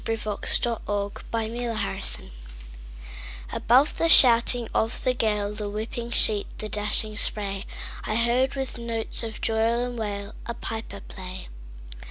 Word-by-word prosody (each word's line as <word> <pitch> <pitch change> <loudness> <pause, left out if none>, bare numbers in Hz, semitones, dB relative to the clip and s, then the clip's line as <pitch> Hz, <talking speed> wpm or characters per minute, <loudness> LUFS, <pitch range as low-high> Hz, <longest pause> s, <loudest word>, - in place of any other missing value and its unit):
Clinton 215 -2 -3
Scollard 205 -4 +1 0.2
Bag 225 -1 -2
Pipes 240 -1 -3
at 195 0 -5
Sea - - +1 1.2
ABOVE 260 +6 +3
the 330 - +2
shouting 240 -4 +6
of 225 +1 0
the 255 - +2
gale, 210 -4 -1
The 210 -1 -4
whipping 225 +3 -5
sheet, 215 -3 +3
the 215 - -4
dashing 210 +1 -1
spray,I 205 +1 0
heard, 240 +4 +1
with 265 -3 -4
notes 230 -1 -3
of 225 -2 -6
joy 220 0 +1
and 235 +2 0
wail,A 205 +2 -6
piper 220 -4 -6
play. 185 -1 -10
225 Hz, 135 wpm, -25 LUFS, 210-235 Hz, 1.2 s, shouting